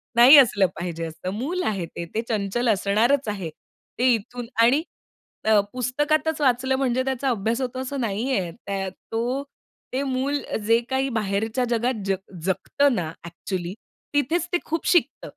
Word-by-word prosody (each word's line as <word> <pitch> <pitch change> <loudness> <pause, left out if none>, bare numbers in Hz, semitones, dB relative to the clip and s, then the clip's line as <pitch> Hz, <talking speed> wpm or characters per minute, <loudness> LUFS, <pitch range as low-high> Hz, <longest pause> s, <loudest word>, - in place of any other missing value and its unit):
नाही 255 +5 +9
असलं 215 -7 +6
पाहिजे 170 -1 -4
असं. 165 +3 -6
मूल 320 - -2
आहे 195 -5 -1
ते. 170 +1 -7
ते 215 +7 -3
चंचल 220 +3 0
असणारच 220 +7 +2
आहे. 190 -6 -4
ते 245 +10 -2
इथून 230 +2 -4
आणि 270 +7 +4 0.6
अ, 215 -1 +5
पुस्तकातच 295 +5 0
वाचलं 260 0 +2
म्हणजे 260 -1 +1
त्याचा 265 0 -1
अभ्यास 230 +2 0
होतो 255 0 -3
असं 265 +1 -4
नाहीये. 210 -3 -1 0.2
त्या 195 -1 -2
तो 240 +8 -3 0.5
ते 265 - 0
मूल 275 +2 -1 0.3
जे 230 +1 +5
काही 265 +1 0
बाहेरच्या 220 +4 -1
जगात 235 -1 0
ज 195 - +2 0.3
जगतं 275 +8 +1
ना 165 -4 -2
एक्चुअली 175 +1 -5 0.4
तिथेच 320 +5 +1
ते - - +5
खूप 325 +1 -2
शिकतं. 335 -5 +2
240 Hz, 150 wpm, -24 LUFS, 200-265 Hz, 0.6 s, नाही